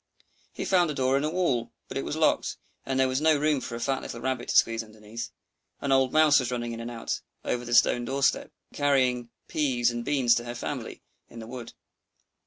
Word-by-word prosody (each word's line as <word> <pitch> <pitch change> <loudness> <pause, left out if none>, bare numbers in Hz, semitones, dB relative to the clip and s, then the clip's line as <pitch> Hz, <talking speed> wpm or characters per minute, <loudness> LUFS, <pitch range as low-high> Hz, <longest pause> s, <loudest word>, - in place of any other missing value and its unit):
He - - -5
found 180 -3 +3
a 150 - -3
door 130 0 +2
in 140 - +1
a 155 - +1
wall; 155 -9 0
but - - -8
it - - -1
was - - -3
locked, - - +1 0.3
and 135 -1 0
there 130 - +4
was 130 +2 -1
no 155 -1 +4
room 150 -2 +1
for 115 - -5
a - - -5
fat 135 +2 -1
little 115 - -7
Rabbit 130 0 -2
to - - -1
squeeze 115 0 +3
underneath. 110 +1 -8 0.5
An 140 - -2
old 135 -1 +4
Mouse 155 -2 +6
was 125 -2 -2
running 120 -1 -3
in 115 - -6
and 115 +1 -5
out 115 -1 -4 0.2
over 120 - -1
the 120 0 0
stone 120 - +4
door 135 +3 -2
step, - - +2 0.2
carrying 130 -4 +1 0.2
peas 125 -5 +1
and 120 0 -4
beans 130 -3 +3
to 120 - -1
her 120 0 -5
family 120 - -5 0.3
in 115 - -13
the 115 - -7
wood. 120 0 -8
125 Hz, 225 wpm, -27 LUFS, 120-140 Hz, 0.5 s, Mouse